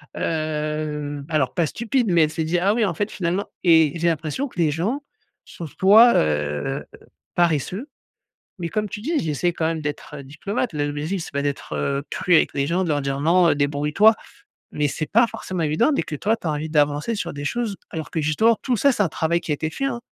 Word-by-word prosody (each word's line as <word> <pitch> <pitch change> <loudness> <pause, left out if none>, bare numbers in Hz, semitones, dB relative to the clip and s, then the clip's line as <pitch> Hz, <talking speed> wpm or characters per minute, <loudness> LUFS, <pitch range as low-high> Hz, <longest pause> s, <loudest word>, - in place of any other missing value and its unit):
hem, 150 -2 -3
alors 150 -5 0
pas 170 - +2
stupide, 235 - -1
mais 170 -2 +5
elle 150 - -4
s'est 160 - -2
dit: 170 +3 0
«Ah 195 +4 +2
oui, 230 -2 +2
en 180 - -1
fait, 205 +6 -2
finalement» 180 +2 -2 0.2
et 160 -4 +5
j'ai 170 - +1
l'impression 160 - -2
que 210 - -11
les 165 -2 +3
gens 200 - -1 0.4
sont 170 - -8
soit, 215 - +6
heu, 75 -1 0 0.5
paresseux. 175 - 0 0.7
Mais 170 -2 -3
comme 210 +3 -1
tu 215 - -6
dis, 310 +8 -1
j'essaie 165 +2 0
quand 160 - -1
même 160 -1 -1
d'être 150 0 -5
diplomate. 175 - -3
Le 145 - 0
l'objectif 155 +6 -3
c'est - - -10
pas 140 - -1
d'être, 145 -1 -3
heu, 140 0 -1
cru 180 - +1
avec - - +2
les 140 0 0
gens 180 +5 0
de 170 - -2
leur 145 -1 +1
dire: 135 0 -2
«Non 170 +3 +4
heu, 145 - +3
débrouille-toi» 150 +9 +3 0.6
mais 150 -1 +1
c'est 155 +3 -3
pas 235 +3 +5
forcément 185 -6 -5
évident 155 - +2
dès - - +1
que 150 - -6
toi 210 +9 +1
tu - - -9
as - - +1
envie 150 +1 -3
d'avancer 150 +7 +1
sur 200 - -4
des 145 0 -6
choses 225 +4 -2
alors 160 -2 -6
que, 160 - -1
justement, 220 +10 +3
tout 255 - 0
ça 280 +7 +4
c'est 210 - +1
un 190 - +1
travail 165 +4 0
qui 160 - -6
a - - +2
été 155 +2 -3
fait, 275 - -4
hein. 235 -3 -3
160 Hz, 225 wpm, -22 LUFS, 150-200 Hz, 0.7 s, soit